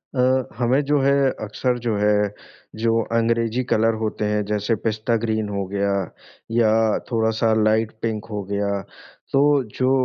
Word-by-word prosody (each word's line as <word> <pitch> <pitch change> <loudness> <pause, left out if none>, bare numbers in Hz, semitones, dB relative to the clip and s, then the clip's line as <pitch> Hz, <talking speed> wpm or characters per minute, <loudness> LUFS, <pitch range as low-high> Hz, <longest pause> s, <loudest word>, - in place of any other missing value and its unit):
अ, 130 0 +2
हमें 125 +3 +2
जो 145 +1 +2
है, 140 +1 +3 0.3
अक्सर 125 +4 -1
जो 115 -2 -1
है 105 0 +2 0.5
जो 115 0 +3 0.2
अंग्रेजी 115 +1 +1
कलर 115 +1 +3
होते 110 0 -2
हैं 105 0 0
जैसे 105 +2 0
पिस्ता 110 +1 0
ग्रीन 110 -2 -1
हो 100 -1 -2
गया 100 0 0 0.6
या 115 -1 +3 0.4
थोड़ा-सा 110 -1 +1
लाइट 110 +1 +2
पिंक 110 -2 -2
हो 105 -1 -3
गया। 100 +1 -2 0.6
तो 135 - +4 0.4
जो 130 0 +3
110 Hz, 150 wpm, -22 LUFS, 105-120 Hz, 0.6 s, तो